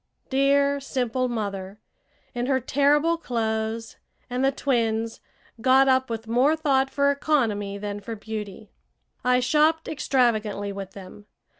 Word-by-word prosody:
Dear, 280 +1 +3
simple 255 -2 -1
mother, 200 -3 -4 0.5
in 245 0 -2
her 265 -1 +2
terrible 290 +6 +2
clothes, 225 -4 -3 0.3
and 250 +1 -1
the 270 - +4
twins, 230 -5 -1 0.4
got 265 +2 +5
up 260 -1 +3
with 225 -1 -5
more 255 +7 +3
thought 275 -4 +1
for 280 +1 +2
economy 225 -9 0
than 205 0 -5
for 225 +3 -6
beauty! 210 -1 -7 0.5
I 250 0 +3
shopped 305 +5 +2
extravagantly 220 -8 0
with 195 -1 -7
them. 200 +2 -12
245 Hz, 130 wpm, -25 LUFS, 215-275 Hz, 0.5 s, got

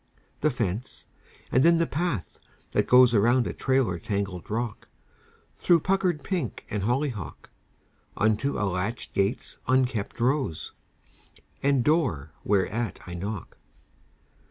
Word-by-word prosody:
The 155 - +3
fence; 115 -2 -3 0.5
and 130 - +4
then 170 0 +6
the 165 - +2
path 155 - -3 0.3
that - - +1
goes 125 -1 +7
Around 120 +3 +4
a - - -3
trailer 130 -10 +1
tangled 100 -1 -3
rock, 115 +1 -3 0.7
Through 170 -3 +3
puckered 185 -4 +1
pink 175 - -3
and 105 - -1
hollyhock, 120 -1 -2 0.7
Unto 110 +6 +1
a 105 - 0
latch 100 +5 -3
gate's 100 +4 -1
unkempt 130 -5 +1
rose, 130 - 0 0.9
And 140 -3 +3
door 125 - +1
whereat 105 +3 0
I 90 - -7
knock. 95 +3 -6
120 Hz, 120 wpm, -26 LUFS, 100-140 Hz, 0.9 s, goes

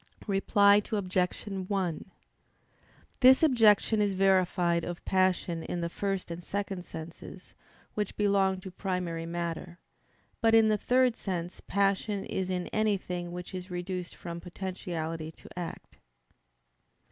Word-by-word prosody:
Reply 200 0 +4
Obj. 185 -3 0
1: 190 -2 -2 1.1
This 260 +3 +7
objection 220 -6 +5
is 200 -2 +1
verified 180 -3 +3
of 175 0 -6
passion 185 -3 +1
in 175 +1 -4
the 170 - -1
first 195 -1 -3
and 170 +1 -6
second 195 -2 -3
senses, 170 +3 -10 0.4
which 210 -2 -3
belong 195 -2 +2
to 190 - -8
primary 180 -3 -3
matter. 170 0 -4 0.6
But 225 0 +5
in 220 -1 +6
the 215 - +3
third 250 0 +3
sense 180 -5 -4
passion 200 +1 +1
is 190 -1 -2
in 180 -1 -1
anything 185 -5 -1
which 180 +1 -7
is 185 0 -6
reduced 180 0 -4
from 170 -1 -6
potentiality 170 -3 -4
to - - -16
act. 175 -2 -7
185 Hz, 125 wpm, -29 LUFS, 175-200 Hz, 1.1 s, This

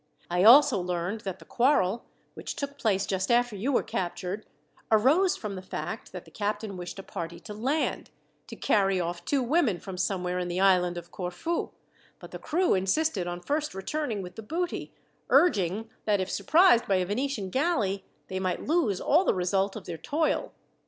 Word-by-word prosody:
I 180 +1 +2
also 265 +1 +8
learned 180 +4 -2
that 190 -2 -5
the 165 - -16
quarrel, 235 - +2 0.3
which - - -6
took 280 0 -5
place 200 -3 +1
just 190 -1 -2
after 240 -2 +2
you 225 +8 -1
were 255 - +2
captured, 185 +3 -4 0.4
arose 285 - +4
from 210 -2 -5
the 185 - -6
fact 185 - -6
that - - -8
the - - -17
captain 210 -1 -3
wished 180 0 -7
a 195 - -7
party 170 -1 -6
to 210 - -8
land, 265 +9 -1 0.4
to - - -8
carry 195 -2 +2
off 175 0 -3
two 270 +6 +1
women 245 - +2
from 185 +2 -8
somewhere 180 -1 -1
in 180 - -2
the 175 +1 -2
island 180 -2 +3
of 175 0 -8
Corfu; 185 - -3 0.5
but - - -12
the - - -7
crew 355 +4 +1
insisted 195 - +1
on 175 0 -4
first 295 - -2
returning 220 0 -3
with 180 +3 -10
the - - -5
booty, 340 +10 -3 0.4
urging, 210 - +3 0.2
that 210 -2 +2
if 185 0 -2
surprised 335 -7 +4
by 195 - +3
a 185 -1 +1
Venetian 210 -1 -2
galley, 220 - 0 0.2
they 190 - -3
might 185 -1 -2
lose 285 - +1
all 325 +6 +3
the - - +2
result 190 +2 0
of 215 - -8
their 165 -2 -6
toil. 305 - -1
200 Hz, 185 wpm, -28 LUFS, 185-270 Hz, 0.5 s, also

